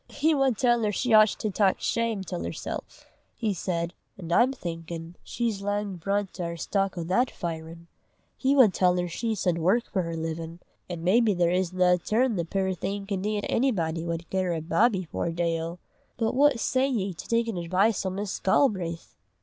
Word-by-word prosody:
"He 310 +3 +2
wad 270 -5 +2
tell 240 -2 +3
her 210 -1 +1
she 245 +4 -1
oucht 215 -1 +6
to 215 - -1
tak 195 -1 +2
shame 230 -4 -1
till 175 -1 -5
hersel'," - - -4 0.5
he 220 -3 -1
said, 170 -1 -2 0.2
"an' 170 -3 -7
I'm 240 +9 +5
thinkin' 165 -6 -6
she's 230 -4 -2
lang 205 -1 -2
brunt 195 +2 -2
a' 175 - -1
her 170 0 -4
stock 195 +2 -1
o' 170 - -2
that 235 +10 +1
firin'. 165 0 -6 0.5
He 275 +1 +1
wud 240 -9 +6
tell 180 -1 +3
her 180 0 0
she 220 +6 -2
sud 180 -3 0
work 195 +9 +3
for 190 - -2
her 165 -1 -4
livin', 165 +1 -5 0.3
an' 170 -2 -5
maybe 210 +3 +3
there 175 -1 +2
isna 180 0 +2
ae - - +3
turn 230 +6 +1
the 170 -3 -1
puir 190 +2 -1
thing 195 +3 -4
can 195 -2 -2
dee 210 +1 -1
'at 205 - -3
onybody 170 -11 0
wad 170 0 -3
gie 190 - 0
her 180 -2 0
a - - -2
bawbee 195 +4 +2
for 165 - -3
a - - -1
day 165 -1 -1
o'! 165 +2 -5 0.4
But 225 -1 0
what 275 -1 +4
say 260 +3 +1
ye 200 -8 -1
to 165 - -10
takin' 230 -2 0
advice 185 +5 +1
o' 190 - -1
Miss 195 +1 -4
Galbraith?" 185 -7 +1
190 Hz, 205 wpm, -27 LUFS, 170-225 Hz, 0.5 s, oucht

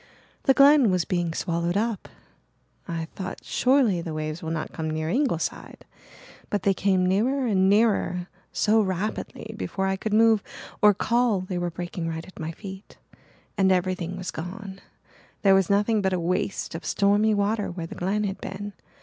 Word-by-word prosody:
The 270 - +5
Glen 280 -4 +7
was 180 -2 +1
being 175 -2 -1
swallowed 170 +2 -1
up. 220 -2 -2 0.8
I 165 -1 -3
thought, 185 -1 -6
'Surely 250 -9 +2
the 165 -2 -5
waves 155 +1 -4
will 160 - -4
not 160 -1 -3
come 160 -1 -3
near 155 0 -2
Ingleside' 250 - -2 0.6
but 205 - -1
they 195 - +3
came 190 -1 +2
nearer 245 +9 +1
and 190 -4 +3
nearer 200 -4 +2 0.2
so 220 +1 +3
rapidly 205 +3 -3
before 190 -2 -3
I 190 0 +1
could 215 +2 -4
move 220 0 +5 0.4
or 210 -1 +6
call 235 -2 +1
they 185 -1 -4
were 175 0 -1
breaking 175 0 -5
right 160 0 -5
at 185 - -14
my 160 0 -3
feet 190 +2 -10 0.6
and 190 -1 +4
everything 185 -1 0
was 185 -1 -4
gone 190 +4 -7 0.6
there 195 -1 +6
was 195 -2 +3
nothing 210 +2 +2
but 190 -1 0
a 180 - 0
waste 185 +3 -2
of 165 - -6
stormy 205 +2 +2
water 205 +1 0
where 175 -1 -5
the - - -8
Glen 200 +4 -1
had 195 -1 -3
been. 205 +1 -6
190 Hz, 175 wpm, -25 LUFS, 175-210 Hz, 0.8 s, Glen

